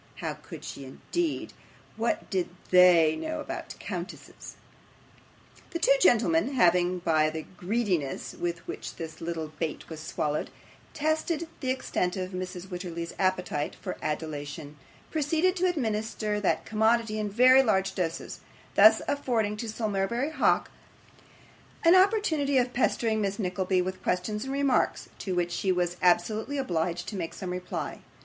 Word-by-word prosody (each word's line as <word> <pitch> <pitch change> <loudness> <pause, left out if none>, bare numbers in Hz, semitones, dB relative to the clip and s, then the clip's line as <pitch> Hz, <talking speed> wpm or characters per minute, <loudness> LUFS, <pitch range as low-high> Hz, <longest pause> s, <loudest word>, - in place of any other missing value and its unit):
How - - -3
could - - -11
she, 140 - -7
indeed? 320 - -3 0.4
what 230 +1 -1
did 185 -3 0 0.2
THEY 175 -4 +7
know 315 - -4
about - - -6
countesses? - - -7 1.1
The 345 - -3
two - - +4
gentlemen 275 - +3
having, 180 -3 +4
by 155 -3 +2
the 160 0 -5
greediness 180 - -1
with 170 -1 -4
which - - -6
this 160 -1 -8
little 165 -2 -3
bait 160 -3 -3
was 160 -2 -7
swallowed, 155 -1 -2 0.5
tested 315 +2 0
the 260 - -3
extent 195 -8 -1
of 185 0 -3
Mrs. 185 -1 -5
Wititterly's 175 -2 -5
appetite 180 -6 0
for - - -5
adulation, 150 -1 -4 0.4
proceeded 320 +4 +1
to 365 +1 +2
administer 220 -8 -1
that 200 - 0
commodity 220 0 +2
in 210 -1 -1
very 255 +5 +7
large 195 -6 +1
doses, 170 -3 -3 0.3
thus - - +7
affording 235 -7 0
to 225 +1 -4
Sir 220 0 -2
Mulberry 230 +8 -1
Hawk - - +2 1.1
an 335 - +8
opportunity 370 -8 +3
of 250 0 +1
pestering 225 -3 +1
Miss 200 -1 -1
Nickleby 185 -1 0
with 185 +1 -5
questions 210 +5 -1
and 270 - -3
remarks, 275 -2 +1
to 190 -2 -3
which 175 -1 0
she 190 +2 0
was 175 -1 0
absolutely 215 +9 +2
obliged 175 -7 -1
to 210 - -6
make 170 -4 -4
some 185 -2 -5
reply. 180 0 -4
195 Hz, 145 wpm, -28 LUFS, 175-255 Hz, 1.1 s, an